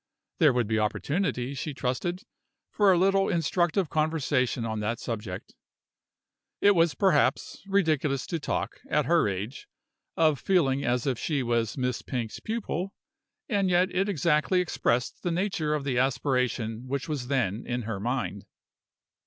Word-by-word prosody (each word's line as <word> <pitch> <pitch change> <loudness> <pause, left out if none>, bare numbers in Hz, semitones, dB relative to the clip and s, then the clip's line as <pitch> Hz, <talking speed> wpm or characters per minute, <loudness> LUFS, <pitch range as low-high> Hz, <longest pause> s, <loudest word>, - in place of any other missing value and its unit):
There 155 -5 +6
would 125 -2 +1
be 110 +1 0
opportunities, 135 - -1
she 150 -2 -4
trusted, 155 +9 -2 0.5
for 205 -2 +4
a 180 - +4
little 195 +2 +3
instructive 175 0 +1
conversation 145 -6 0
on 110 -1 -2
that 110 +2 -2
subject. 105 -6 -5 1.1
It 205 - +6
was, 170 -3 +3
perhaps, 150 -8 +2
ridiculous 155 -8 +1
to 165 - -3
talk, - - -3
at 150 -1 +2
her 170 -8 +3
age, 100 +6 -4 0.5
of 155 -4 +3
feeling 140 -8 +2
as 125 +1 0
if 130 -4 0
she 145 -5 -1
was 120 0 0
Miss 125 -2 -1
Pink's 120 -4 -4
pupil; 200 -4 -3 0.5
and 200 -5 +1
yet 180 +1 +2
it 195 +2 +1
exactly 165 +1 +2
expressed 125 -8 0
the 175 - -1
nature 170 -4 0
of 150 - -3
the 130 -3 0
aspiration 125 -3 0
which 140 +1 -3
was 145 -6 -3
then 120 -5 0
in 125 0 -2
her 110 -2 -4
mind. 120 -3 -3
140 Hz, 150 wpm, -27 LUFS, 120-175 Hz, 1.1 s, There